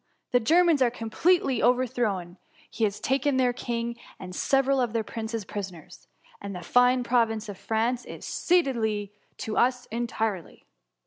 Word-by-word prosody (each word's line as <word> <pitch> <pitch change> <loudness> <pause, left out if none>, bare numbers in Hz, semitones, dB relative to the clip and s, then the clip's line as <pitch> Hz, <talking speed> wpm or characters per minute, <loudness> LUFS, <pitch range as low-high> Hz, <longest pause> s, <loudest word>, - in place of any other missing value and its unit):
The 245 - +4
Germans 325 +4 +4
are 250 - +5
completely 260 +6 +1
over 250 +1 +3
thrown. 200 -8 -2 0.3
He 225 - 0
has 205 -1 -2
taken 270 +1 +1
their 250 -1 +3
king, 235 -1 -3 0.2
and 185 -1 -9
several 270 +5 +2
of 240 -3 -1
their 225 -1 0
princes 220 -1 -5
prisoners; 185 -6 -8 0.3
and 200 -1 -6
the 180 - -7
fine 245 +5 +4
province 230 -3 +1
of 200 -2 -8
France 230 +3 0
is - - -9
ceded 230 - +1 0.3
to 215 - -4
us 250 0 +2
entirely 225 -5 -3
235 Hz, 150 wpm, -27 LUFS, 215-255 Hz, 0.3 s, are